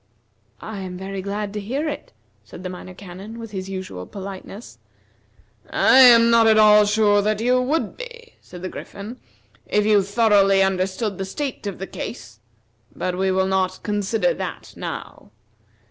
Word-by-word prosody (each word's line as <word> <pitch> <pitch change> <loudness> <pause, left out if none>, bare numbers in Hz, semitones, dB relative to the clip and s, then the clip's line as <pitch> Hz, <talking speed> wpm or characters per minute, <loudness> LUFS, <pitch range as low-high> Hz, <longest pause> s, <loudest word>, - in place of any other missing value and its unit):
"I 220 -2 -6
am 185 -1 -6
very 190 +1 -5
glad 200 +1 -4
to 210 - -3
hear 265 +10 -3
it," 300 - -6 0.3
said 105 - -12
the 185 - -4
Minor 185 0 -10
Canon, 195 +4 -10
with 225 -2 -8
his 190 -1 -5
usual 185 - -6
politeness. 195 +2 -9 0.9
"I 260 - +5
am 235 -2 +8
not 230 -1 +5
at 220 -1 +5
all 210 -1 +7
sure 205 -1 +3
that 210 +1 0
you 250 +2 +2
would 295 +6 -1
be," 475 -1 -10
said 180 0 -12
the 185 - -3
Griffin, 215 +5 -9 0.5
"if 210 0 +1
you 210 -1 +5
thoroughly 200 -1 +4
understood 190 +2 -1
the 195 - -2
state 265 +2 -5
of 200 - -4
the 195 - -5
case, 120 - -8 0.6
but 180 -1 -2
we 190 +1 0
will 190 0 +2
not 190 -1 -1
consider 210 - 0
that - - -6
now. - - -7
205 Hz, 165 wpm, -22 LUFS, 190-225 Hz, 0.9 s, am